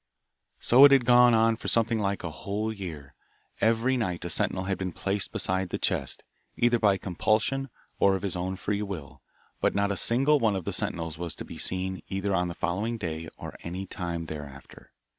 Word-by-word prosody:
So 130 +3 +6
it 145 - +7
had 135 -3 +5
gone 120 -1 +6
on 115 0 +3
for - - -7
something 115 -1 +2
like 100 -1 -1
a 85 - -4
whole 105 +7 -3
year; 80 -9 -8 0.5
every 115 +3 +2
night 90 -7 -2
a 85 - -2
sentinel 95 +4 +1
had 95 -1 -2
been 95 -1 -3
placed 100 +2 -2
beside 95 0 -1
the - - -2
chest, - - -1 0.3
either 120 0 +3
by 100 -3 +3
compulsion 110 +9 0 0.3
or 100 -1 +4
of 95 - -5
his 100 -3 -2
own 90 +1 -2
free 100 +2 -2
will, 95 -9 -7 0.4
but - - +1
not 100 0 +1
a - - -1
single 135 - +4
one 110 -5 +2
of 95 -3 -4
the - - -2
sentinels 80 -2 -1
was 85 -2 -4
to - - -8
be - - -10
seen, 95 0 -2
either 95 +1 -2
on 90 -1 +1
the 85 - -6
following 100 +7 -2
day 80 -5 -5
or - - -8
any 90 +3 -5
time 85 -2 -4
thereafter. 70 -4 -10
95 Hz, 200 wpm, -27 LUFS, 90-110 Hz, 0.5 s, it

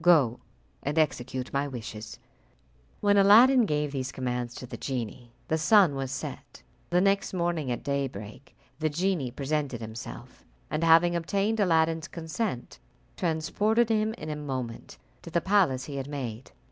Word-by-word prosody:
Go 150 -9 +4 0.4
and 145 +3 -3
execute 130 -4 -1
my 140 +1 0
wishes." 110 -4 -7 0.8
When 205 0 +4
Aladdin 230 +5 +7
gave 150 -2 0
these 130 -2 -3
commands 125 -2 -3
to - - -7
the 125 - -8
genie, 120 -2 -5 0.2
the 160 - 0
sun 185 -1 +5
was 135 -1 -3
set. 100 - -7 0.3
The 180 +1 +3
next 195 0 +1
morning 170 -5 -1
at 120 - -3
daybreak 130 -3 -4 0.2
the 155 0 +1
genie 170 -3 0
presented 140 -1 -2
himself, 110 0 -9 0.3
and, 155 +2 -1
having 165 +1 +5
obtained 200 +6 0
Aladdin's 165 -3 +2
consent, 165 - -4 0.4
transported 205 +8 +1
him 220 0 +1
in 155 -8 -6
a - - -3
moment 130 -6 -5 0.2
to - - -9
the 170 - +1
palace 170 -9 +2
he 140 -2 -6
had 135 0 -4
made. 125 -5 -5
155 Hz, 150 wpm, -28 LUFS, 130-180 Hz, 0.8 s, Aladdin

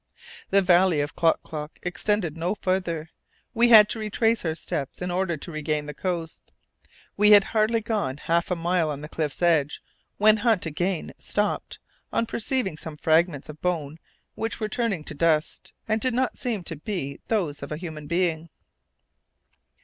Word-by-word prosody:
The 200 0 +4
valley 180 -2 +4
of 145 - -4
Klock 165 -1 +2
Klock 150 -1 -7
extended 180 -2 -1
no 175 +5 -1
farther; 175 -5 -2 0.4
we 240 0 +4
had 215 -3 +9
to 225 - -3
retrace 225 +1 +1
our 160 -2 -1
steps 155 -5 -4
in 180 0 -3
order 175 -2 0
to 170 - -8
regain 155 -1 -2
the 150 - -6
coast. 170 +1 -4 0.7
We 210 +1 +7
had 205 -1 +8
hardly 220 +2 +1
gone 210 - -2
half 170 +2 0
a 180 - +1
mile 170 -1 0
on 145 -1 -4
the 150 - -7
cliff's 155 +1 -3
edge 155 -4 +2 0.4
when 215 +1 +6
Hunt 220 -4 +2
again 175 +3 -2
stopped, 205 0 -2 0.3
on 230 - +1
perceiving 230 - -2
some 155 -1 -8
fragments 160 -2 +2
of 155 0 -11
bones 160 -4 -2 0.3
which 225 +1 -4
were 215 - -1
turning 215 -9 -1
to 155 - -5
dust, 155 0 0 0.2
and 220 0 0
did 255 -2 0
not 255 0 0
seem 225 -7 -3
to 165 -2 -6
be 150 -6 -4
those 170 -10 -1
of - - -7
a 150 - -3
human 155 -3 -7
being. 170 -1 0
175 Hz, 170 wpm, -25 LUFS, 155-210 Hz, 0.7 s, had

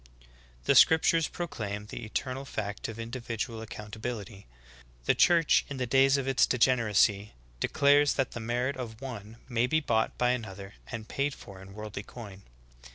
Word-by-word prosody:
"^ - - -28 0.2
16. - - -24 0.3
The - - +3
scriptures 160 0 +5
proclaim 105 - -5
the - - -8
eternal 130 +5 -3
fact 105 -6 -4
of 110 - -7
indi 115 +3 -5
vidual 115 -1 -4
accountability;* 110 -1 -7 0.6
the - - +4
Church 170 -3 +4
in 140 - -5
the 125 - -1
days 135 +3 +4
of 135 -1 -3
its 135 -1 +3
de 125 - 0
generacy 110 -4 +3 0.3
declares 145 - +4
that 135 -2 -1
the - - -6
merit 120 +4 -1
of 115 -4 -7
one 115 -4 -8
may 120 -1 +1
be 155 +5 +2
bought 115 -7 0
by 125 0 +2
another 100 -5 -5 0.2
and 115 -2 -6
paid 140 +3 -1
for 95 -3 -12
in 95 +1 -12
worldly 105 -1 -6
coin. 100 -3 -11
115 Hz, 175 wpm, -29 LUFS, 105-135 Hz, 0.6 s, scriptures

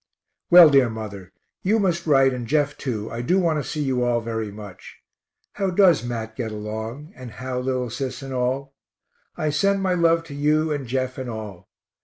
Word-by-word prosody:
Well, 175 -3 +9
dear 135 -4 +5
mother, 100 -4 -7 0.3
you 210 +4 +2
must 175 -5 0
write 135 -3 +4
and 120 -2 -5
Jeff 145 +1 +1
too 110 -5 -4
I 115 - -4
do 175 +10 +1
want 165 -5 +1
to - - -8
see 150 -2 -2
you 130 -3 0
all 120 -1 +1
very 110 -2 -4
much. 100 -3 -11 0.6
How 195 -2 -1
does 180 -6 +4
Mat 115 -2 -5
get 115 -2 -4
along, 110 - -6
and 130 -2 -9
how 125 0 -4
little 125 -2 -2
Sis 130 +2 -4
and 135 -1 -6
all? 130 +2 -2 0.6
I 155 -1 -1
send 195 +5 +1
my 185 -1 +1
love 165 -1 +3
to 165 -3 -10
you 155 +2 +1
and 140 -4 -3
Jeff 130 +1 -2
and 130 -2 -5
all. 105 -5 -8
130 Hz, 195 wpm, -23 LUFS, 115-155 Hz, 0.6 s, Well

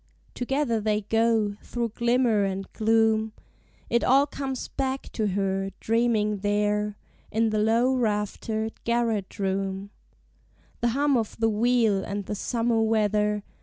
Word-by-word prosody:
Together 250 -3 -1
they 210 0 0
go, 225 -1 +1
through 235 -1 -3
glimmer 235 -1 +2
and 195 0 -3
gloom: 220 0 +2 0.5
It 235 - +1
all 275 +3 +5
comes 270 -3 -4
back 265 0 -3
to 215 -2 -1
her, 195 0 -1
dreaming 220 -2 +1
there 210 +1 0 0.3
In 225 0 +1
the 215 - +1
low 230 +4 +3
raftered 220 -1 -2
garret 230 -4 -1
room; 195 0 -2 0.9
The 240 - +1
hum 285 -2 +3
of 225 -2 -3
the 225 0 +3
wheel, 225 -2 +2
and 200 0 -4
the - - -4
summer 230 +2 0
weather. 210 -1 +1
220 Hz, 130 wpm, -26 LUFS, 210-235 Hz, 0.9 s, all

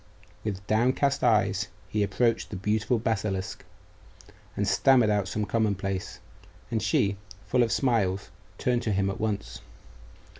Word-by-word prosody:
With 100 -2 -4
downcast 130 +6 +2
eyes 105 -5 +2 0.2
he 105 - -1
approached 115 +3 +1
the - - -6
beautiful 110 +5 0
basilisk, 105 -4 -2 0.9
and 100 - 0
stammered 115 +3 +4
out 100 -2 +1
some 105 +2 -2
commonplace; 100 -4 -1 0.5
and 110 -2 0
she, 105 -4 +1 0.3
full 125 - +2
of 115 -2 +2
smiles, 100 -7 +1 0.3
turned 125 -1 +1
to 110 - -1
him 100 0 +1
at - - -7
once. 100 - -3
105 Hz, 135 wpm, -27 LUFS, 100-115 Hz, 0.9 s, stammered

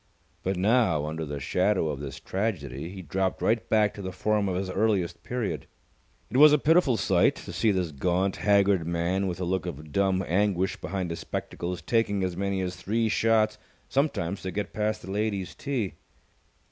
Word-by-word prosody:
But 95 0 -1
now, 105 -6 +3
under 80 +1 -4
the 70 0 -4
shadow 90 +4 +1
of 70 -2 -3
this 70 -2 -6
tragedy, 85 - -3
he 95 0 -8
dropped 95 +4 -1
right 115 +1 0
back 105 -1 +3
to 100 - -8
the 95 -1 -4
form 105 +1 0
of 90 - -1
his 95 +1 -2
earliest 95 -4 0
period. 120 -4 -3 0.6
It 125 - 0
was 150 +2 +9
a 150 - +6
pitiful 150 -4 +3
sight - - +3
to - - -9
see 110 - +2
this 90 -5 0
gaunt, 90 +6 0
haggard 100 -4 +3
man 85 +3 0
with 90 - -3
the 90 - -3
look 95 -1 -1
of 75 +2 -7
dumb 95 +2 +1
anguish 95 0 +1
behind 95 -3 -3
his 85 - -4
spectacles 90 0 -4
taking 100 -4 +1
as 90 -2 -1
many 100 0 -1
as 90 0 -3
three 110 +5 0
shots 110 -1 +2 0.3
sometimes 100 - 0
to 95 - -4
get 100 +3 -4
past 110 0 -1
the 95 - -7
ladies' 100 -2 -2
tee. 125 -9 -2
95 Hz, 185 wpm, -27 LUFS, 90-110 Hz, 0.6 s, was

